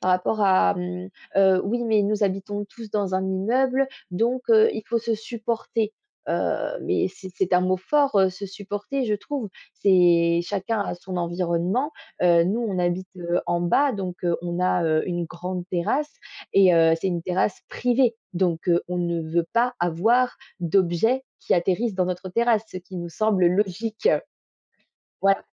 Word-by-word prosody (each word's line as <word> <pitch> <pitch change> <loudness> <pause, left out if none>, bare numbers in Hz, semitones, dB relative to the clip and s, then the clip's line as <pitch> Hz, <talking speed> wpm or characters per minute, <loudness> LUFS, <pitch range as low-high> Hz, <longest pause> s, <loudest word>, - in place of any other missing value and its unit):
par 185 - +1
rapport 185 +4 +1
à, 195 0 +4
mmh, 180 0 -5 0.3
heu, 190 -1 +5
«Oui, 240 +4 -1
mais 220 -2 +3
nous 205 +1 +1
habitons 200 +1 -2
tous 225 0 -11
dans 200 -3 -1
un 190 - +1
immeuble, 255 +8 +1 0.2
donc 235 +7 0
heu, 445 0 +6
il 220 - -5
faut 235 - +1
se 230 0 -1
supporter», 225 -1 -3 0.4
heu, - - -1
mais - - +1
c'est 190 - -11
c'est 190 -1 -1
un 180 - +5
mot 185 +1 +1
fort, 280 +6 +1
heu, 190 -1 +4
se 195 +2 -7
supporter, 205 +7 -4
je 215 -3 0
trouve, 245 +2 -4 0.3
c'est 170 -3 +4
chacun 205 +4 -2
a 200 - -2
son 185 +1 -7
environnement, 175 - -1 0.3
heu, 170 -1 +5
nous, 205 +7 0
on 205 -6 -2
habite, 175 +1 -1
heu, 175 0 -1
en 175 0 0
bas, 265 +11 +2
donc 185 -4 -4
heu, 170 -1 +2
on 175 0 -3
a, 180 -1 +2
heu, 155 -1 +2
une 175 -1 -2
grande 180 +2 -5
terrasse 260 - -1 0.4
et 190 -3 +6
heu, 165 -1 +5
c'est 190 - -1
une 175 -2 -2
terrasse 185 +2 0
privée, 245 -1 +1 0.2
donc 175 -1 -1 0.2
on 180 - -2
ne 170 -1 -1
veut 165 +1 -1
pas 240 +2 +2
avoir 220 +9 +2 0.2
d'objets 185 +8 +2 0.2
qui - - +1
atterrissent 190 +5 0
dans 185 -1 +1
notre 180 +1 -4
terrasse, 230 +1 +2
ce - - -9
qui 185 +1 -11
nous 175 -1 -5
semble 195 0 +2
logique. 210 - 0 1.1
Voilà. 195 0 +2
190 Hz, 175 wpm, -24 LUFS, 175-225 Hz, 1.1 s, heu